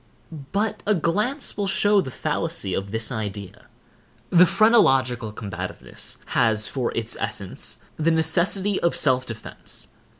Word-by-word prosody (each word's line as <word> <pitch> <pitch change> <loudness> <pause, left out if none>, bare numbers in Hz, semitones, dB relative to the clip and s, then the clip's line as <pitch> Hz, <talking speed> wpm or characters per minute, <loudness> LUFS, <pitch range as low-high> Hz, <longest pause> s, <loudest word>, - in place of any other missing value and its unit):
But 215 +1 -1
a 210 - +4
glance 210 - 0
will 200 -1 -1
show 205 +1 +3
the 150 - -5
fallacy 150 - -2
of 100 +1 -2
this 110 +3 -1
idea. 105 -4 -6 0.6
The 180 +1 +7
phrenological 135 - +3
combativeness 105 -3 -7 0.2
has 110 -2 +3
for 130 -3 -2
its 115 -1 0
essence, - - -4 0.2
the 160 +1 +2
necessity 170 +5 +2
of 170 - +1
self 130 -3 +3
defence. 110 -2 -6
155 Hz, 130 wpm, -24 LUFS, -, 0.6 s, The